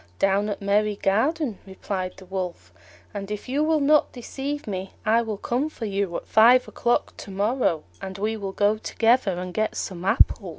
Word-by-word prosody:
"Down 195 +2 +2
at 205 - -4
Merry 205 +1 +2
garden," 235 - 0
replied 190 -1 -5
the 190 - -12
Wolf; 180 - -5 0.4
"and 200 -1 -5
if 210 +3 -5
you 280 +4 +1
will 315 0 +2
not 295 +1 +4
deceive 275 +4 -5
me 190 -2 -5
I 225 +2 +4
will 220 -3 -4
come 250 +8 -1
for 235 - -6
you, 200 -3 -2
at - - -8
five 240 +3 +6
o'clock 240 0 0
to - - -9
morrow, 200 - 0 0.2
and 190 0 -6
we 215 +3 -1
will 200 -3 -4
go 205 +2 +1
together 225 -2 +2
and 180 0 -5
get 215 +2 -1
some 180 -2 -4
apples." 195 0 +3
210 Hz, 185 wpm, -24 LUFS, 195-240 Hz, 0.4 s, five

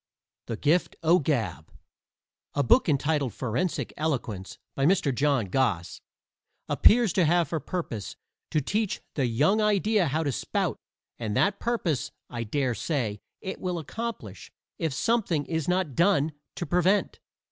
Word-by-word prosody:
THE 115 - -3
GIFT 160 +7 +2
O' 170 +3 +5
GAB 115 - -2 0.8
A 145 - +2
book 215 - +4
entitled 145 -3 +1
Forensic 130 +8 -2
Eloquence, 120 -11 -3 0.2
by 135 - -2
Mr. 160 -3 +3
John 140 -3 +2
Goss, 95 -4 -1 0.7
appears 230 -4 +5
to 185 - +3
have 170 +1 +3
for 165 - -1
purpose 125 - -4 0.3
to 155 - +1
teach 210 +8 -1
the 135 -4 +1
young 150 - +2
idea 210 -2 +2
how 155 +4 0
to 145 - 0
spout, - - -1 0.4
and 110 -3 -2
that 200 0 +2
purpose, 195 - -1 0.2
I 120 -1 -3
dare 125 +3 0
say, 115 -7 -2 0.2
it 190 - -6
will 180 -2 -2
accomplish 165 - -6 0.3
if 160 -2 0
something 180 - +1
is 160 -1 -2
not 180 -5 +1
done 165 -2 +3 0.2
to 175 - -3
prevent. 180 +5 +2
155 Hz, 145 wpm, -27 LUFS, 130-185 Hz, 0.8 s, O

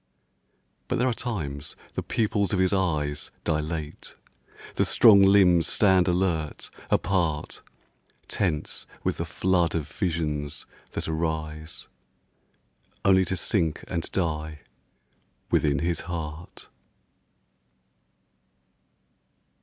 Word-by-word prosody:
But - - 0
there 125 - +2
are 125 - +2
times 75 - -5 0.2
the - - -2
pupils 105 -3 0
of - - +2
his 95 +1 +2
eyes 75 -6 0
Dilate, 75 0 -3 0.6
the - - +2
strong 105 -4 +7
limbs 95 -4 +5
stand 95 -4 +4
alert, 85 -4 -1 0.2
apart, 85 -5 0 0.7
Tense 85 -7 -2 0.2
with - - -1
the - - -2
flood 90 -3 +1
of 80 -4 -2
visions 75 -5 -3 0.3
that - - -3
arise 80 0 -3 1.2
Only 95 -1 +5
to 95 +2 -2
sink 85 -3 0
and 85 - -3
die 80 -4 -2 0.9
within 70 -2 +3
his 85 +3 -1
heart. 80 -1 -7
85 Hz, 100 wpm, -26 LUFS, 75-95 Hz, 1.2 s, strong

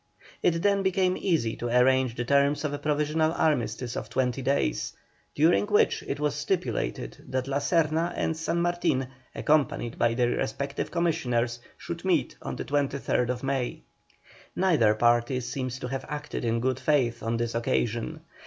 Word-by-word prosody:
It 165 -1 +1
then 200 -1 +3
became 190 -1 +2
easy 160 - 0
to 120 - -3
arrange 125 0 +3
the 120 - -3
terms 140 +3 +2
of 145 - -1
a 145 - -3
provisional 150 +2 +1
armistice 130 -6 0
of 110 - -5
twenty 125 +1 0
days, 130 - 0 0.4
during 165 +7 +4
which 210 0 +3
it 140 - -3
was 150 -1 +1
stipulated 150 - -2
that 130 0 -1
La 140 0 0
Serna 165 +2 +1
and 160 - -1
San 165 +1 -1
Martin, 170 -7 0 0.3
accompanied 145 -6 +1
by 115 0 +2
their 120 -1 +2
respective 140 +6 -2
commissioners, 125 -9 0 0.2
should - - -6
meet - - +1
on - - -4
the - - -5
23rd 135 -3 0
May. 135 -2 -2 0.7
Neither 150 - +3
party 120 +3 +2
seems 130 0 -4
to 125 - -5
have 135 +1 -4
acted 150 -4 -4
in 115 0 +1
good 130 +1 0
faith 125 -6 +1
on 115 +1 -1
this 115 0 -2
occasion. 115 +5 -1
140 Hz, 160 wpm, -27 LUFS, 120-155 Hz, 0.7 s, during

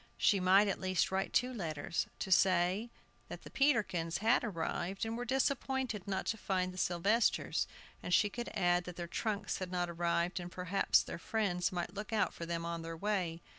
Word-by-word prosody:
She 200 - +4
might, 190 +3 +5
at 195 - -1
least, 185 -1 +1
write 190 0 -1
two 255 0 +2
letters, 160 -7 -2
to 190 - -4
say 185 +4 +3 0.4
that - - -7
they - - -21
the - - -10
Peterkins 210 - +1
had 225 +4 +3
arrived, 190 0 -2
and 225 0 -3
were 245 +1 -3
disappointed 265 -4 -1
not 190 -1 -2
to 225 - -1
find 185 -3 -1
the 185 - -7
Sylvesters. 195 +8 +1 0.3
And - - -5
she 205 +4 +5
could 240 +4 -5
add 175 -2 +2
that 180 - -7
their 175 - -4
trunks 205 0 -2
had 185 -1 -5
not 175 -1 -1
arrived, 170 +1 0
and 175 0 -7
perhaps 180 +2 +2
their - - -7
friends 180 -3 0
might 175 -2 -3
look 210 +2 -6
out 215 -2 +1
for 170 - -7
them 170 0 -2
on 170 0 -3
their 165 0 -6
way. 180 -4 -1
185 Hz, 200 wpm, -34 LUFS, 175-215 Hz, 0.4 s, might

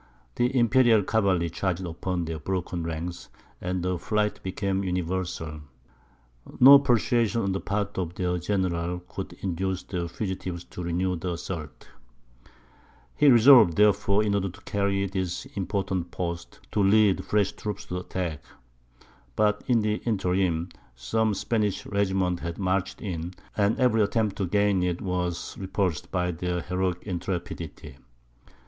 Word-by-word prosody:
The 125 - +1
imperial 120 -2 +5
cavalry 95 -6 +1
charged 95 0 -2
upon 85 +1 -3
their 80 -1 -4
broken 90 +1 -3
ranks, 85 +2 -5 0.3
and 90 0 -2
the 90 -1 -1
flight 105 +2 -1
became 95 +1 -2
universal. 90 -4 -3 1.0
No 140 +2 +10
persuasion 120 -3 +2
on 100 - 0
the 95 - -1
part 100 -1 -2
of 90 -1 -3
their 90 -1 -1
general 90 -2 -1
could 90 - -7
induce 95 0 -2
the 85 -3 -4
fugitives 90 -2 -4
to 90 - -9
renew 90 +1 -1
the 90 +2 -3
assault. 80 -3 -7 1.3
He 150 - +4
resolved, 120 - +8
therefore, 105 0 +3
in 105 -1 0
order 100 -1 0
to 95 +3 -14
carry 100 -1 0
this 95 -2 -3
important 95 -2 -2
post, 85 -1 -5
to 105 - +1
lead 100 0 +4
fresh 105 -2 +1
troops 105 -2 -6
to - - -8
the 90 - -1
attack. 90 -5 -4 0.9
But 105 -1 +2
in 120 -3 +3
the 105 0 0
interim, 90 -5 0 0.3
some 100 - 0
Spanish 105 -2 -1
regiments 95 -3 0
had 85 -1 -4
marched 95 0 -1
in, 90 -2 -4 0.2
and 105 +1 +2
every 125 -4 +3
attempt 105 0 +1
to 95 - -1
gain 100 0 +2
it 90 -1 0
was 90 -2 -3
repulsed 95 -4 -2
by 90 -1 0
their 90 +1 -2
heroic 90 0 -2
intrepidity. 85 -6 -5
95 Hz, 140 wpm, -26 LUFS, 90-100 Hz, 1.3 s, No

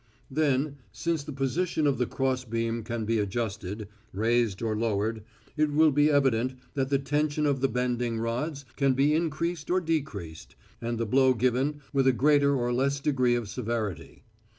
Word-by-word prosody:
Then, 140 0 +1
since 165 -3 -2
the 150 - -7
position 150 +4 -1
of 140 -3 +2
the 125 - +1
cross 130 -1 -1
beam 115 0 -2
can 115 0 -4
be 115 +1 +1
adjusted, 105 -1 -3 0.2
raised 115 0 +1
or 110 -1 0
lowered, 110 0 -1 0.3
it 155 0 +2
will 155 +1 +5
be 145 +2 +4
evident 130 -4 +2 0.2
that 135 -2 -1
the 140 - +3
tension 145 +2 0
of 140 -3 +1
the 135 - +4
bending 125 -1 -1
rods 130 +6 -3
can 135 -2 +2
be 140 +3 +3
increased 165 0 -1
or 185 +1 +3
decreased, 135 - -4 0.3
and 120 0 -2
the 115 - -1
blow 130 +3 +4
given 130 +5 0
with 135 -1 +3
a 130 - +5
greater 140 +2 +4
or 120 -1 0
less 140 +3 +1
degree 130 -4 +2
of 120 -3 -2
severity. 110 - -4
130 Hz, 175 wpm, -28 LUFS, 115-145 Hz, 0.3 s, will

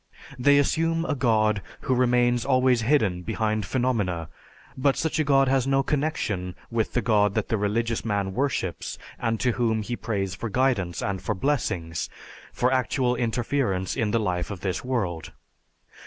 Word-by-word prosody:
They 145 +3 +5
assume 165 +3 +1
a 155 - 0
god 110 -6 +2 0.2
who 130 - 0
remains 120 -1 +3
always 130 -2 +3
hidden 110 -8 +2
behind 110 +2 -1
phenomena, 105 -11 -1 0.5
but 135 +1 +2
such 160 0 -1
a - - +4
god 135 -2 +4
has 135 0 +2
no 135 0 +3
connection 135 - -1 0.2
with 115 -2 -1
the 125 - 0
God 105 -3 +3
that - - -1
the 110 - +1
religious 115 +3 0
man 100 -3 -1
worships 125 -8 -2 0.2
and 115 -1 -1
to 125 - +2
whom 110 -2 0
he 120 +3 -3
prays 100 -6 -2
for 115 - -5
guidance 105 -7 0
and 95 -2 -2
for 105 +2 -2
blessings, 90 - -1 0.4
for 125 +2 +1
actual 130 0 +1
interference 115 -4 -1
in 115 -5 0
the 115 - +1
life 90 -5 -1
of 100 -4 -6
this 95 -2 -2
world. 95 -11 -2
115 Hz, 165 wpm, -25 LUFS, 100-130 Hz, 0.5 s, They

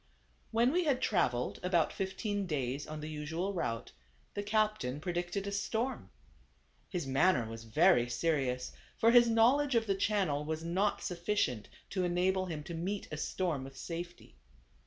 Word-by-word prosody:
When 235 +3 +3
we 355 +2 +1
had 275 -4 +2
traveled 125 - 0
about 180 -3 +2
fifteen 200 +1 -2
days 140 -3 -2
on 155 0 -6
the 155 - -5
usual 160 +5 -3
route, 115 -11 -3 0.4
the 205 - -2
captain 210 - 0
predicted 175 +4 -2
a 200 - -3
storm. 220 +6 -2 0.8
His 175 -5 -3
manner 135 -2 +3
was 115 0 -8
very 120 0 +4
serious; 125 -2 0 0.3
for 230 - +5
his 240 -1 +7
knowledge 250 +5 +4
of 225 -1 +3
the 200 - +1
channel 190 -7 +1
was 160 +1 -3
not 190 +5 0
sufficient 170 - -1 0.2
to 185 -2 0
enable 185 +2 +1
him 155 -4 -4
to 170 - -7
meet 190 +5 -3
a 155 - -4
storm 155 -3 -1
with 135 0 -10
safety. 170 - -7
175 Hz, 155 wpm, -33 LUFS, 150-205 Hz, 0.8 s, his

